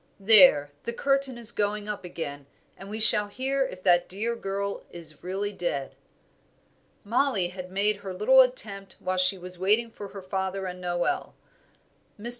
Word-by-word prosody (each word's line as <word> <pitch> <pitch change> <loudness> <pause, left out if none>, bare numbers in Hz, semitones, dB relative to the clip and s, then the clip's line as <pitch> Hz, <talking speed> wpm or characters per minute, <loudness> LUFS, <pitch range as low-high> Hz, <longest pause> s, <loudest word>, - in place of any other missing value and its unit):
There! 185 -9 +6
the 235 - -5
curtain 275 0 0
is 235 -1 +1
going 210 0 -2
up 210 -2 -5
again, 145 -5 -7 0.3
and 195 - -11
we 215 +1 -6
shall 210 -1 +7
hear 265 +5 -1
if 185 0 -11
that 175 -1 +3
dear 220 +5 -3
girl 200 -2 -4
is 165 -2 -11
really 195 +3 -3
dead." 145 -8 -4 1.1
Mollie 225 -4 +1
had 185 0 -9
made 200 +2 0
her 200 -2 -8
little 215 +8 +5
attempt 210 -6 0
while 185 0 -3
she 185 +1 +2
was 180 0 -10
waiting 215 +5 +1
for 205 -2 -9
her 195 -1 -10
father 190 0 -3
and 180 0 -7
Noel. 175 -1 -2 0.8
Mr. 230 +3 -6
195 Hz, 165 wpm, -26 LUFS, 180-215 Hz, 1.1 s, shall